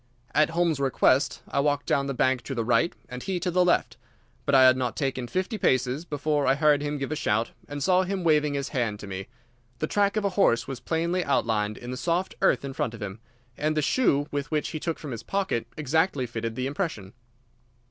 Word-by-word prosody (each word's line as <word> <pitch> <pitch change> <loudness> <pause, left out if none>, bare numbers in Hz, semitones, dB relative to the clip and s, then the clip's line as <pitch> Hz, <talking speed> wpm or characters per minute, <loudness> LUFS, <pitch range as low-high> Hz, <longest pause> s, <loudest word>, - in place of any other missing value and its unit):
At 155 0 +4
Holmes' 165 -3 +1
request 135 0 +2
I - - -1
walked 145 0 +1
down 140 -4 +1
the 140 - -3
bank 130 0 +2
to 135 - -4
the 115 -2 -1
right, 120 +8 +3 0.2
and 125 0 -7
he 185 +3 -2
to 180 - -1
the 180 +1 +3
left, 180 - +1 0.5
but 140 - +4
I 130 - +8
had 130 0 +7
not 125 -2 -2
taken 135 -3 -2
fifty 190 - -2
paces 130 +4 +1
before 150 -2 0
I 135 - +4
heard 145 0 +3
him 150 0 -2
give 135 +1 -4
a - - 0
shout, 115 -4 0 0.2
and 145 -1 -4
saw 185 +3 +4
him 190 0 -2
waving 150 -3 +3
his 140 -1 -2
hand 115 -7 -1
to - - -7
me. 95 0 -6 0.5
The 155 - -1
track 200 +5 +1
of 210 - 0
a - - +3
horse 180 - +2
was 135 -2 -5
plainly 170 +2 -1
outlined 105 -6 0
in 120 0 -7
the 125 - -4
soft 175 +7 -1
earth - - +3
in 135 - -5
front 115 -3 -2
of 115 - -12
him, 100 +1 -6 0.4
and 155 +3 -1
the 155 - +2
shoe 145 - +2
which 145 +1 -2
he 155 - -4
took 165 +1 -2
from 150 - -7
his 115 - -5
pocket 195 - -2
exactly 155 -1 +1
fitted 115 -1 -4
the 130 +1 -2
impression. 140 - -3
145 Hz, 225 wpm, -26 LUFS, 125-165 Hz, 0.5 s, I